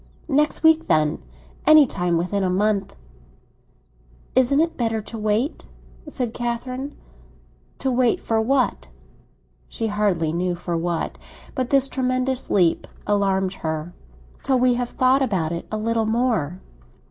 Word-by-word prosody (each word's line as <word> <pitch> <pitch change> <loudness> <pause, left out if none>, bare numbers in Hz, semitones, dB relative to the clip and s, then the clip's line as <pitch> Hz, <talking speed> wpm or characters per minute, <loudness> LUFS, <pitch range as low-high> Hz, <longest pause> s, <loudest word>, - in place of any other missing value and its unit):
"Next 300 +3 +2
week, 320 0 +5
then. 150 - +2 0.5
Any 310 -1 +8
time 175 -7 -1
within 180 +4 -1
a 185 - +1
month." 200 +1 0 1.4
"Isn't 260 +2 +4
it 330 +1 +1
better 225 -2 -1
to 220 +2 -7
wait?" 215 +7 -1 0.4
said 250 -5 -3
Catherine. 255 +4 -4 0.8
"To 265 - -1
wait 245 -1 +2
for 225 -1 0
what?" 255 - 0 0.8
She 225 - -3
hardly 180 -7 +1
knew 175 +1 -1
for 175 0 -4
what; 170 0 -2 0.3
but 255 -3 -2
this 275 -1 +3
tremendous 255 0 -1
leap 175 -4 +2 0.2
alarmed 195 -2 +1
her. 160 +2 -3 0.5
"Till 265 - +1
we 250 0 +3
have 245 0 -2
thought 260 +2 +2
about 190 -11 0
it 170 0 -5
a 215 - -1
little 225 0 0
more." 220 - 0
225 Hz, 135 wpm, -22 LUFS, 185-255 Hz, 1.4 s, Any